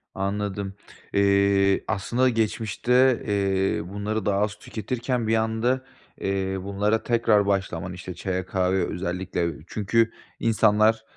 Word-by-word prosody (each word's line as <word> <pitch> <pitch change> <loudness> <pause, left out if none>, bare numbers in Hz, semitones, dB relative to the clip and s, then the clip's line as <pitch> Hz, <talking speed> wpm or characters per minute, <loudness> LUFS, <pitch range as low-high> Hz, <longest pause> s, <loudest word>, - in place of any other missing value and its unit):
Anladım. 100 0 -2 0.4
Eee, 100 0 +3
aslında 120 +5 +1
geçmişte, 120 +3 +2
eee, 95 -3 0
bunları 105 +2 -3
daha 100 -1 +2
az 105 0 0
tüketirken 120 +3 -3
bir 110 - +3
anda, 115 +4 0 0.4
eee, 95 0 -1
bunlara 105 +3 0
tekrar 115 -4 +3
başlaman, 90 -3 -1
işte, 90 0 -7
çaya, 95 0 -3
kahveye 95 0 +1
özellikle 90 -1 -2 0.2
çünkü 115 +2 +1 0.3
insanlar, 110 0 +3
100 Hz, 115 wpm, -25 LUFS, 95-110 Hz, 0.4 s, Eee